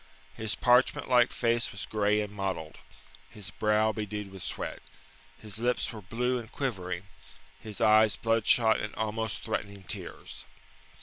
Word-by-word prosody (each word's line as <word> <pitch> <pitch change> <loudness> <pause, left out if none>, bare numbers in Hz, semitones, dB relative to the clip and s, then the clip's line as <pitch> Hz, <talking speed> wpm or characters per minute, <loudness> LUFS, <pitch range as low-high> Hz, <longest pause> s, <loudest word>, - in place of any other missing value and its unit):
His 110 -1 -2
parchment 125 +1 +3
like 125 -2 +5
face 120 0 +1
was 100 - -5
grey 105 0 +2
and 105 -1 -5
mottled, 95 -6 -4 0.5
his 105 -1 -7
brow 105 +1 +2
bedewed 105 -2 -5
with 95 -1 -10
sweat; - - -5 0.6
his 105 -1 -4
lips 120 +1 0
were 110 - -8
blue 125 +6 -1
and 115 -2 -10
quivering, 95 -9 -3 0.6
his 105 -3 -4
eyes 110 -1 +5
bloodshot 115 0 +3
and 105 - -5
almost 110 0 -2
threatening 100 -3 -4
tears. - - -7
110 Hz, 140 wpm, -29 LUFS, 100-115 Hz, 0.6 s, like